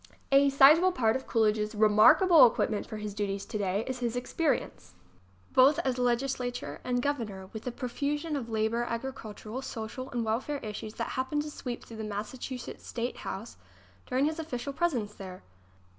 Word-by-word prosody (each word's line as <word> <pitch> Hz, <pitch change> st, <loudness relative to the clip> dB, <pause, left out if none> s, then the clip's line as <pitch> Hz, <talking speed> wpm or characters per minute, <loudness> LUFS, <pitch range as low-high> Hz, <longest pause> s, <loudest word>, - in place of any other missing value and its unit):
A 275 Hz, +1 st, +6 dB
sizable 300 Hz, +7 st, +7 dB
part 230 Hz, -10 st, +1 dB
of 265 Hz, -, -4 dB
Coolidge's 215 Hz, -1 st, +1 dB
remarkable 250 Hz, -, +7 dB
equip 230 Hz, -, 0 dB
ment 210 Hz, -, -3 dB
for 215 Hz, -, -6 dB
his 210 Hz, -1 st, -5 dB
duties 200 Hz, -1 st, -3 dB
today 205 Hz, -1 st, -1 dB
is 260 Hz, -1 st, -4 dB
his 240 Hz, -1 st, -2 dB
experience, 275 Hz, +5 st, -2 dB, 0.6 s
both 270 Hz, +3 st, +6 dB
as 255 Hz, -1 st, 0 dB
legislator 245 Hz, 0 st, -1 dB
and 245 Hz, -1 st, -1 dB
Governor, 210 Hz, -10 st, -3 dB
with 220 Hz, -, -7 dB
the 250 Hz, -, -2 dB
profusion 285 Hz, +6 st, -3 dB
of 245 Hz, -5 st, -4 dB
labor, 220 Hz, +1 st, 0 dB
agricultural, 230 Hz, -1 st, -5 dB
social 255 Hz, +1 st, -6 dB
and 240 Hz, -2 st, -2 dB
welfare 245 Hz, +7 st, -1 dB
issues 215 Hz, 0 st, -6 dB
that -, -, -3 dB
happened 295 Hz, +3 st, -1 dB
to 300 Hz, -, -7 dB
sweep 245 Hz, -4 st, -6 dB
through 225 Hz, -, -10 dB
the 220 Hz, -, -5 dB
Massachusetts 225 Hz, +4 st, -6 dB
State 240 Hz, +1 st, -3 dB
House 205 Hz, +5 st, -6 dB, 0.5 s
during 260 Hz, +2 st, +1 dB
his 315 Hz, +2 st, -1 dB
official 280 Hz, -3 st, -4 dB
presence 265 Hz, -11 st, -1 dB
there. 185 Hz, -2 st, -9 dB
245 Hz, 165 wpm, -29 LUFS, 215-275 Hz, 0.6 s, sizable